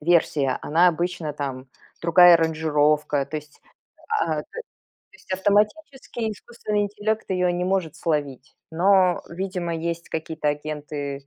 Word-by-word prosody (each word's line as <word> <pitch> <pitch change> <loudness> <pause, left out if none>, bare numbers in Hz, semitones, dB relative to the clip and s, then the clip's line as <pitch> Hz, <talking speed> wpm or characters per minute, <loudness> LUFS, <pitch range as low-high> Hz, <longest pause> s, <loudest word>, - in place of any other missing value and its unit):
версия, 150 -4 +2
она 170 +4 +4
обычно 170 -2 -2
там 135 -2 -5 0.3
Другая 175 +1 +7
аранжировка. 150 -3 +1
То 155 - -5
есть 150 -1 -10 0.5
ат 155 -2 -1
То 470 - -7 0.5
есть 190 - -10
автоматически 220 +5 0
искусственный 210 -1 -3
интеллект 210 +2 -2
ее 180 -1 +1
не 175 +1 -2
может 185 -4 -1
словить. 145 -5 -3 0.2
Но, 185 +1 +3
видимо, 180 -1 -3
есть 170 +1 -4
какие-то 160 -1 -3
агенты, 145 -2 -4
165 Hz, 125 wpm, -23 LUFS, 150-190 Hz, 0.5 s, Другая